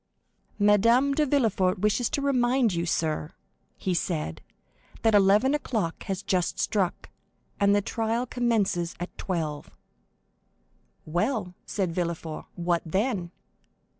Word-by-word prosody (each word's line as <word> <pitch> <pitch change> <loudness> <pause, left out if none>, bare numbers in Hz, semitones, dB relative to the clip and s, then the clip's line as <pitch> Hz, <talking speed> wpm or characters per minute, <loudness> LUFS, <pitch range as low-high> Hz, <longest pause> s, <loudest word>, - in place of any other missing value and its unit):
"Madame 230 +7 +4
de 300 +1 +1
Villefort 220 -9 +2
wishes 210 +5 +1
to 280 - -2
remind 250 -4 +2
you, 170 0 -1
sir," 155 - -1 0.4
he 185 - -1
said, 160 - -2 0.6
"that 225 -1 +4
eleven 205 +7 +5
o'clock 220 - -2
has 195 0 -3
just 180 -2 0
struck, 190 -4 -1 0.5
and 200 0 +4
that 205 -1 +1
the - - -9
trial 230 +2 0
commences 220 -9 0
at 175 - -6
twelve." 155 -6 -3 1.4
"Well," 180 - -1
said 190 -4 -1
Villefort, 170 -2 -3
"what 175 -1 0
then?" 190 +1 -1
200 Hz, 120 wpm, -27 LUFS, 175-235 Hz, 1.4 s, eleven